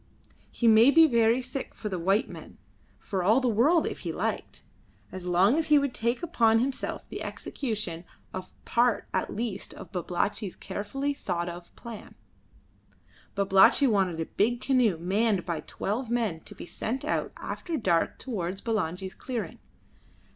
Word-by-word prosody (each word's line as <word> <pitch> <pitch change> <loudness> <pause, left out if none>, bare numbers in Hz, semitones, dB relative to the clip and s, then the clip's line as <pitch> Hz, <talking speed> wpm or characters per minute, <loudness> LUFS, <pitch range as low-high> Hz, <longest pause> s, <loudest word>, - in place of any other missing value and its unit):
He 235 - 0
may 225 +3 +7
be 325 +3 +7
very 235 -2 +3
sick 255 +2 -5
for 215 - -5
the 185 -4 -3
white 195 +5 +2
men, - - -11 0.4
for 190 -2 -3
all 215 +8 +4
the 255 - 0
world 270 +10 +4
if - - -4
he - - -4
liked, - - -3 0.5
as 185 -1 -7
long 190 - +4
as 320 - -1
he 300 - +6
would 280 -3 +1
take 235 +7 -1
upon 230 -10 +3
himself 260 +3 -2
the - - -6
execution 210 - -4 0.3
of 185 0 -6
part 240 -1 +2
at - - -1
least 215 -3 -4
of - - -11
Babalatchi's 185 +2 -2
carefully 270 +8 -3
thought 175 -10 -3
of 175 0 -9
plan. 230 -3 -10 1.2
Babalatchi 195 +7 +5
wanted 190 -8 +2
a 165 - -1
big 235 +8 0
canoe 250 -8 +2
manned 195 +3 +1
by 170 -3 -2
twelve 225 +4 -3
men 225 -9 0
to - - -10
be - - -8
sent 240 +8 -3
out - - -1
after 335 -3 -4
dark 175 - +1
towards 190 -7 -4
Bulangi's 190 -4 -2
clearing. 245 -4 -5
220 Hz, 160 wpm, -28 LUFS, 185-245 Hz, 1.2 s, may